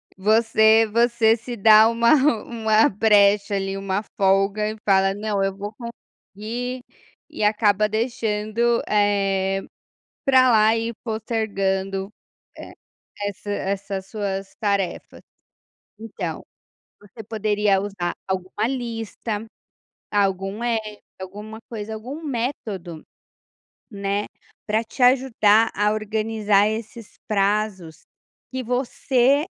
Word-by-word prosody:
Você 220 +2 +4
você 235 -1 +3
se 240 +1 -7
dá 215 +1 +7
uma 230 +2 +3 0.3
uma 220 -2 +2
brecha 205 -1 +3
ali, 195 0 -2
uma 195 0 -2 0.2
folga 195 +2 +2
e 220 - -9
fala: 195 -1 +3
"Não, 205 -1 -2
eu 195 0 -1
vou 205 +2 -7
conseguir". 235 +1 -7 0.5
E - - -5
acaba 210 0 +2
deixando, 225 0 0
eh, 195 -2 +1 0.6
pra 260 -1 +5
lá 220 0 +4
e 230 +1 -3
postergando 195 -3 -2 0.5
e - - -10 0.5
essa 205 +1 -7
essas 195 -1 -3
suas 195 -2 -4
tarefas. 200 -3 -2 0.8
Então, 225 0 -6 0.6
você 205 +2 -12
poderia 210 -2 +1
usar 195 -4 -3
alguma 190 +3 -2
lista, 225 -3 -4 0.7
algum 195 +1 -1
app, 220 -3 -2 0.2
alguma 210 +4 -8
coisa, 220 -1 -5
algum 255 +9 -7
método, 225 - -4 0.9
né, 200 0 -2 0.4
para 220 +1 +1
te 230 +4 -9
ajudar 230 -4 +4
a 210 0 +2
organizar 215 -1 +1
esses 220 0 -6
prazos, 200 -5 -1 0.5
que 260 0 -3
você 255 +3 +1
215 Hz, 105 wpm, -22 LUFS, 200-225 Hz, 0.9 s, dá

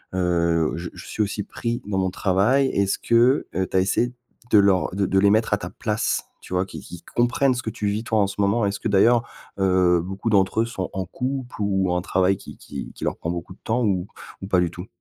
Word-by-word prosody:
heu, 85 -3 +1
je 85 +1 -5
je - - -11
suis 110 - -3
aussi 105 0 -1
pris 120 0 -4
dans 100 -2 -2
mon 95 0 +1
travail», 100 +9 +2
est-ce 100 0 +1
que, 120 +4 +3
heu, 95 +1 0
tu - - 0
as - - +6
essayé 120 +6 +1 0.4
de 105 - +7
leur 100 -2 +3
de 100 - +1
de 95 +1 +2
les 100 - +5
mettre 110 +1 +2
à 105 - +3
ta - - -6
place? 110 -1 -1 0.2
Tu - - -10
vois? 90 +1 +1
Qu'ils - - -8
qu'ils 90 - -10
comprennent 125 +2 +2
ce 125 - -4
que 110 - -2
tu 105 - -3
vis, 105 +2 -1
toi, 110 -2 +1
en 100 - +3
ce 95 - -7
moment. 100 +3 +2
Est-ce 100 0 -2
que - - -2
d'ailleurs, 115 +4 +4 0.4
heu, 90 -2 +3
beaucoup 95 +5 -4
d'entre 100 +1 +3
eux - - +1
sont 95 -6 -4
en 95 - -2
couple 130 +2 -4
ou 95 -2 +1
ont 90 - +1
un - - -1
travail 95 +1 +1
qui - - -11
qui - - -8
qui - - -10
leur - - -1
prend 85 - -3
beaucoup 85 +1 -6
de - - -23
temps 120 +2 0
ou 95 -3 0 0.4
ou - - -4
pas 90 -3 +3
du 85 - +1
tout? 90 +2 -8
100 Hz, 255 wpm, -23 LUFS, 95-115 Hz, 0.4 s, de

